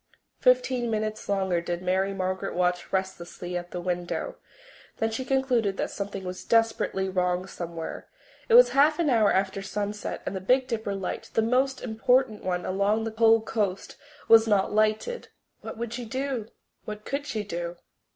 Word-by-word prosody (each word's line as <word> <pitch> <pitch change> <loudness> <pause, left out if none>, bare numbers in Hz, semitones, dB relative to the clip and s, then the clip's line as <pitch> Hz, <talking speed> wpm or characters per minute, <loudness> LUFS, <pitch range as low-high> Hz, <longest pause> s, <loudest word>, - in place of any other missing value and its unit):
Fifteen 375 - +3
minutes 215 -1 -3
longer 190 -3 +1
did 175 +1 -4
Mary 190 +2 +1
Margaret 190 0 -3
watch 180 0 0
restlessly 180 -2 -3
at 175 0 -4
the 180 - -5
window. 175 0 -3 0.6
Then 225 0 0
she 225 +4 -3
concluded 255 -7 +1
that - - -2
something 200 -1 -5
was 180 0 -6
desperately 225 -4 +1
wrong 180 -1 0
somewhere. 170 -3 -6 0.4
It 460 - +6
was - - +9
half 295 +3 +4
an 330 -5 +2
hour 220 -4 +4
after 195 0 0
sunset 205 +1 -4
and - - -3
the 190 - -3
Big 255 +7 +3
Dipper 220 -5 -3
light, 195 -2 -4
the 225 - +3
most 260 +3 +1
important 230 -1 +1
one 180 -1 -2
along 200 +3 +1
the 225 -1 -4
whole 225 0 +5
coast, 205 -4 -2 0.3
was 225 0 +7
not 205 -2 +2
lighted. 215 - +1 0.3
What - - -8
would 235 0 -4
she 245 0 -5
do? 260 -2 -3 0.4
What 210 0 -7
could 285 +1 -3
she 220 -7 -2
do? 175 -3 -5
210 Hz, 170 wpm, -27 LUFS, 185-230 Hz, 0.6 s, was